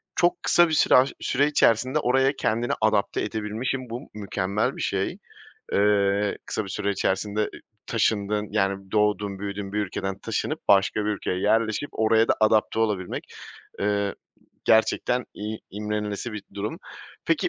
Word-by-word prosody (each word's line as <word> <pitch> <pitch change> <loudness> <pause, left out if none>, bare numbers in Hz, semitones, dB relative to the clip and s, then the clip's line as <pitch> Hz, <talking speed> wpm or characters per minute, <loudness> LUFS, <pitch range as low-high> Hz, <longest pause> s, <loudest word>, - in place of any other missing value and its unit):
çok 175 0 +2
kısa 175 0 +5
bir 155 - -2
süre - - +5
aş 130 +2 +5
süre 140 +3 +1
içerisinde 130 0 +3
oraya 135 +1 +3
kendini 115 +2 0
adapte 110 -2 +2
edebilmişsin, 110 +5 -3
bu 120 +5 -7
mükemmel 100 0 -1
bir - - -5
şey. - - -1 0.6
Eee, 100 0 +2
kısa 110 - -2
bir 95 - -9
süre 100 0 -1
içerisinde, 100 +2 -1
ııı, 105 - +1 0.4
taşındığın, 105 -2 0
yani, 95 -2 -1
doğduğun 105 -2 +1
büyüdüğün 100 0 -5
bir 105 - -1
ülkeden 95 0 -3
taşınıp, - - -3
başka 100 +1 +4
bir 105 - 0
ülkeye 90 -2 -2
yerleşip 110 +6 +1
oraya 110 +1 +3
da - - +4
adapte 110 0 +3
olabilmek. 105 -5 -1 0.6
Iıı, 100 -1 0 0.5
gerçekten 115 +2 +3
i 105 +1 -4
imrenilesi 105 +2 -3
bir 105 -2 -6
durum. 100 +2 -4 0.5
Peki, - - +2
105 Hz, 150 wpm, -25 LUFS, 100-115 Hz, 0.6 s, kısa